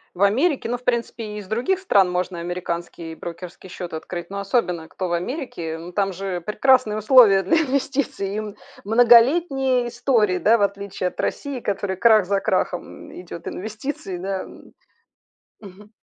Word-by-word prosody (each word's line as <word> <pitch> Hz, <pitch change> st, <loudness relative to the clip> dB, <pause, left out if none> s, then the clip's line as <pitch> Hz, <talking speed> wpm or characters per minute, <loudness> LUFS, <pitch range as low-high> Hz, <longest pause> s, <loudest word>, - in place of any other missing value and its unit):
в 185 Hz, -, 0 dB
Америке, 265 Hz, -, +2 dB
ну, 245 Hz, -, -1 dB
в -, -, -24 dB
принципе, 235 Hz, -1 st, -1 dB
и 210 Hz, 0 st, -7 dB
из 205 Hz, -2 st, -8 dB
других 240 Hz, -, 0 dB
стран 200 Hz, -, +3 dB
можно 180 Hz, -1 st, -2 dB
американский 170 Hz, -1 st, -5 dB
брокерский 175 Hz, +3 st, -9 dB
счет 180 Hz, -1 st, -7 dB
открыть, 175 Hz, +2 st, -6 dB
но 200 Hz, -, -4 dB
особенно, 185 Hz, -6 st, -1 dB
кто 185 Hz, -, -4 dB
в 175 Hz, -, -2 dB
Америке. 175 Hz, -, -4 dB
Ну, 170 Hz, +2 st, -9 dB
там 195 Hz, +1 st, 0 dB
же 185 Hz, -1 st, -4 dB
прекрасные 215 Hz, +3 st, +2 dB
условия 215 Hz, -3 st, +6 dB
для 195 Hz, -, +2 dB
инвестиций 265 Hz, -8 st, -2 dB
и -, -, -1 dB
мн 210 Hz, -2 st, -8 dB, 0.3 s
многолетние 250 Hz, +3 st, +4 dB
истории, 235 Hz, -6 st, +1 dB
да, 220 Hz, +7 st, +4 dB
в 205 Hz, -, +1 dB
отличии 200 Hz, -1 st, -3 dB
от 180 Hz, -, -3 dB
России, 280 Hz, -3 st, -3 dB
которой 200 Hz, -3 st, -2 dB
крах 215 Hz, -1 st, +5 dB
за 200 Hz, +1 st, +1 dB
крахом, 185 Hz, -2 st, -2 dB
м, -, -, -9 dB
идет, 170 Hz, -1 st, -9 dB
инвестиций, 215 Hz, -1 st, -5 dB
да, 190 Hz, +1 st, -3 dB
м. -, -, -15 dB, 0.9 s
Мгм. 205 Hz, +1 st, -14 dB
200 Hz, 170 wpm, -22 LUFS, 180-240 Hz, 0.9 s, условия